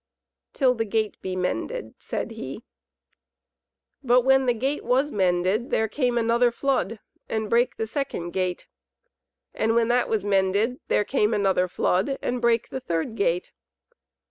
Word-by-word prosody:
"Till 260 -3 +3
the 225 -2 -1
gate 215 0 -2
be 185 -1 -4
mended," 325 - -3
said - - -4
he. 220 - -7 1.4
But 250 -2 +4
when 265 +1 +3
the 245 - +4
gate 270 +6 -2
was 270 +4 +1
mended 185 +4 +1
there 220 - +1
came 245 0 0
another 235 +1 +3
flood 235 -3 -1 0.3
and 220 -1 -2
brake 240 +2 +2
the 225 - -1
second 225 - -4
gate. 185 -1 -2 0.9
And 225 +1 +1
when 230 0 +3
that 245 +1 +2
was 215 -3 0
mended 200 +5 +1
there 210 - +2
came 215 -3 +1
another 190 -3 +2
flood 190 +8 0
and 245 0 -2
brake 235 -1 +2
the 265 - -4
third 170 -2 -2
gate. 180 -4 0
225 Hz, 150 wpm, -25 LUFS, 195-250 Hz, 1.4 s, But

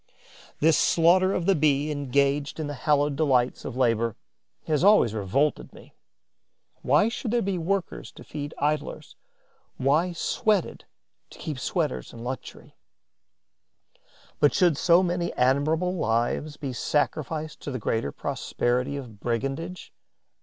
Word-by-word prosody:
This 160 +1 +4
slaughter 180 +3 +4
of 180 - -1
the 195 - +4
Bee 150 -2 +1
engaged 140 +1 0
in 155 - -2
the 145 - -4
hallowed 145 +1 +1
delights 130 -5 +1
of 125 - -5
labour 115 -3 +1 0.5
has 150 0 0
always 200 - +5
revolted 110 +8 0
me. - - -16 0.9
Why 145 +10 +3
should 230 +1 -4
there 235 +1 +1
be 190 -2 -1
workers 185 +2 -3
to - - -12
feed 145 0 -7
idlers, 150 +1 -2 0.6
why 155 +7 +2
sweated 200 +3 -1 0.4
to - - -14
keep 150 -4 -5
sweaters 155 0 -2
in 115 - -9
luxury? 130 +1 -7 1.6
Why 145 - +5
should 175 -2 +3
so 170 +5 +4
many 175 -1 -1
admirable 155 +8 +1
lives 120 +2 -1
be 135 -3 -5
sacrificed 155 +3 -2
to - - -7
the 130 - -3
greater 110 - -1
prosperity 125 - -2
of 120 -7 -9
brigandage? 135 - -4
145 Hz, 130 wpm, -26 LUFS, 130-170 Hz, 1.6 s, always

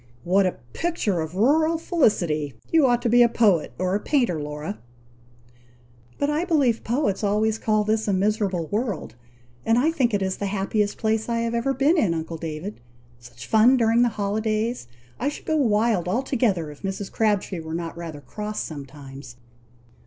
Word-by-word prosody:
"What 185 +2 +3
a 180 - -2 0.2
picture 320 - -1
of 160 +2 -5
rural 315 - +3
felicity! 175 - 0 0.2
You 320 -5 +5
ought 240 -1 +1
to - - +1
be 240 +2 +5
a 240 - +6
poet 205 -9 +2
or 185 +1 -1
a 200 - +1
painter, 235 - 0
Laura!" 150 +7 -5 1.4
"But 285 - 0
I 300 +3 0
believe 285 -10 +1
poets 230 -4 -1
always 215 +2 +1
call 215 -1 +1
this 215 +1 0
a - - +2
miserable 195 -3 0
world: 205 - -2 0.5
and 225 - +2
I 295 +6 +3
think 250 -9 +1
it 200 - 0 0.2
the 200 - -1
happiest 205 +1 -1
place 220 0 -1
I 230 0 0
have 230 0 -2
ever 265 +4 0
been 295 +6 +3
in, 175 - +2
uncle 160 0 -4
David! 160 - -6 0.4
Such 120 -1 -12
fun 230 +4 +5
during 230 0 +3
the 245 - +4
holidays! 215 - -2 0.3
I 280 - 0
should 295 - -9
go 315 - 0
wild 220 - +2
altogether, 220 - 0
if 145 - -14
Mrs. 195 +1 -4
Crabtree 205 -4 0
were 160 0 -6
not 170 -1 -4
rather 165 -4 -7
cross 210 +6 -5
sometimes." 140 -3 -8
210 Hz, 175 wpm, -24 LUFS, 175-240 Hz, 1.4 s, a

